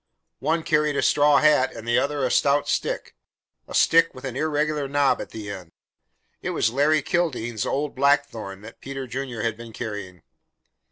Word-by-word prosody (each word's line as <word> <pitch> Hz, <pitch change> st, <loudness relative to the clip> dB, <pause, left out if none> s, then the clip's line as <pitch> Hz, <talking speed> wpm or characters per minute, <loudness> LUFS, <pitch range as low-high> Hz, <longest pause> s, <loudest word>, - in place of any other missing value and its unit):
One 160 Hz, +3 st, 0 dB
carried 150 Hz, -1 st, +1 dB
a -, -, 0 dB
straw 145 Hz, -1 st, +4 dB
hat, 150 Hz, -3 st, +3 dB
and 115 Hz, -, -9 dB
the 120 Hz, -, +3 dB
other 140 Hz, -1 st, -1 dB
a 125 Hz, -, -1 dB
stout 140 Hz, 0 st, +2 dB
stick -, -, -2 dB, 0.5 s
a -, -, -7 dB
stick 165 Hz, 0 st, +4 dB
with 130 Hz, -, -9 dB
an 130 Hz, -2 st, -5 dB
irregular 150 Hz, 0 st, 0 dB
knob 140 Hz, 0 st, +2 dB
at -, -, -7 dB
the 105 Hz, -2 st, -7 dB
end. 90 Hz, -4 st, -9 dB, 0.7 s
It -, -, -3 dB
was 110 Hz, -, +2 dB
Larry 145 Hz, +3 st, +2 dB
Kildene's 125 Hz, -, -1 dB
old 145 Hz, +1 st, -1 dB
blackthorn 130 Hz, -8 st, 0 dB
that 115 Hz, +2 st, -13 dB
Peter 135 Hz, 0 st, -6 dB
Junior 125 Hz, -2 st, -5 dB
had 115 Hz, -2 st, 0 dB
been 115 Hz, 0 st, -11 dB
carrying. 100 Hz, -5 st, -6 dB
135 Hz, 175 wpm, -24 LUFS, 115-150 Hz, 0.7 s, straw